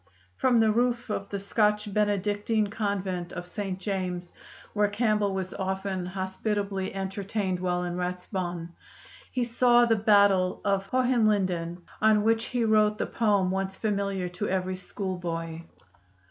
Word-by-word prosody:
From 245 - +3
the 220 -1 +4
roof 240 0 0
of 200 -1 -3
the 200 - -3
Scotch 210 +1 +1
Benedictine 205 +1 +1
Convent 190 -4 -2
of 175 -1 -5
St. 190 +1 -4
James, 185 -3 -3 0.4
where 210 -1 +3
Campbell 210 -1 +1
was 190 -1 -3
often 190 -1 -2
hospitably 195 +1 -2
entertained 195 0 -2
while 180 -1 0
in 175 0 -3
Ratisbon, 180 -1 -3 0.6
he 250 - 0
saw 240 0 +4
the 230 -1 +3
battle 200 -3 +4
of 195 -1 +1
Hohenlinden, 200 -9 +1 0.2
on 215 -1 +5
which 225 +1 +2
he 245 -2 0
wrote 215 -1 +3
the - - -1
poem 205 -5 +1
once 190 0 -2
familiar 200 -3 -1
to 180 +4 -3
every 185 0 -1
schoolboy. 175 -4 -4
200 Hz, 135 wpm, -27 LUFS, 185-215 Hz, 0.6 s, on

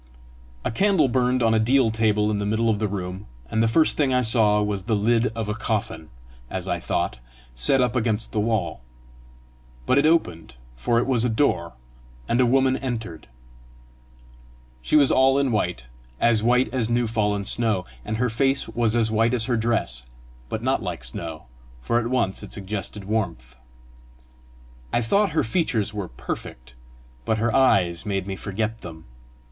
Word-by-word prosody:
A - - 0
candle 190 - +3
burned 125 0 +1
on 115 -1 +3
a 110 - +3
deal 120 +1 +3
table 105 -1 +1
in 105 - -1
the 100 - -2
middle 110 +2 +1
of 105 - -1
the 105 - 0
room, 95 -1 -5 0.2
and 110 - +1
the 115 - +3
first 155 +8 +3
thing 140 -3 +2
I 125 0 +2
saw 110 -3 +3
was 105 -2 -2
the 110 - +1
lid 115 +3 +2
of 115 -2 -3
a 105 - -1
coffin, 105 -7 -3 0.4
as 95 -1 -4
I 90 -1 -1
thought, 60 -5 -2 0.3
set 60 - +2
up 125 -1 0
against 110 -2 -1
the 110 - -1
wall; 110 - -1 1.0
but 130 - +3
it 150 - +3
opened, 90 - 0 0.2
for 65 - 0
it 120 - +2
was 125 -3 +2
a 125 - +1
door, 110 -8 0 0.5
and 120 - +2
a 125 - +4
woman 130 +1 +3
entered. 115 - -5 1.5
She 65 - -1
was 145 -3 +6
all 135 +1 +4
in 140 -2 +1
white 60 - -1 0.3
as 115 -2 +3
white 125 +1 +2
as 120 -4 0
new 120 0 +1
fallen 105 -3 -1
snow; 110 -4 +2 0.2
and 110 - -3
her 125 +2 +1
face 135 +3 +1
was 115 0 0
as 110 -2 +1
white 115 +2 +2
as 115 - +2
her 120 +1 0
dress, 110 - -1 0.4
but 110 - -4
not 130 +1 +1
like 90 -6 -5
snow, 80 +5 -6 0.4
for 115 - 0
at 115 - -2
once 120 -6 0
it - - -9
suggested 100 0 -5
warmth. 85 - -3 1.4
I 120 - +1
thought 200 - +2
her 160 - +2
features 115 - -1
were 100 -3 -4
perfect, 60 -3 -7 0.5
but 110 - 0
her 115 +1 0
eyes 90 -10 +3
made 100 -3 -2
me 95 -1 -4
forget 110 +3 -4
them. 80 -2 -10
110 Hz, 180 wpm, -23 LUFS, 100-125 Hz, 1.5 s, was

